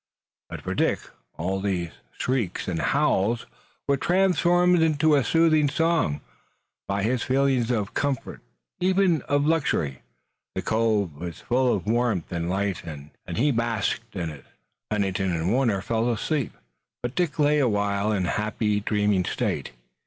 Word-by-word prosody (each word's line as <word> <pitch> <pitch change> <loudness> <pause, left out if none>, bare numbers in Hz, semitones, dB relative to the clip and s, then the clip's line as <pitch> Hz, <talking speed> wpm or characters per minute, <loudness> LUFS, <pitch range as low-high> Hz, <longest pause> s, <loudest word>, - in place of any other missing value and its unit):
But - - -7
for - - -3
Dick - - +1 0.4
all 95 +4 -1
these 90 -4 -2 0.3
shrieks 125 -8 -1
and 85 -3 -1
howls 120 -6 +1 0.4
were 140 -1 +3
transformed 180 0 +3
into 155 -1 +3
a 140 -3 +4
soothing 155 -2 +3
song 160 - +1 0.7
by 100 0 -1
his 120 +3 +1
feeling 130 -3 +1
of 105 -4 -1
comfort, 140 -3 -2 0.4
even 185 -3 +3
of 145 0 +2
luxury. 140 - 0 0.5
The - - -2
cove 110 -6 +1
was 85 +3 -7
full 125 +1 +2
of 100 - -1
warmth 115 -6 0
and 85 -1 -2
light 95 0 -1
and 75 -2 -9 0.2
he 145 +6 +2
basked 115 -1 -1
in 85 -4 -3
it. 75 -3 -12 0.4
Pennington 95 -3 0
and 85 +3 0
Warner 120 -7 +2
fell 115 +1 0
asleep, 135 +3 -1 0.5
but 120 0 -2
Dick 170 -2 -1
lay 150 0 +3
a 130 -4 +3
while 100 0 0
in 95 -4 0
a - - 0
happy, 105 0 0
dreaming 105 -2 +1
state. - - -2
115 Hz, 150 wpm, -25 LUFS, 95-145 Hz, 0.7 s, a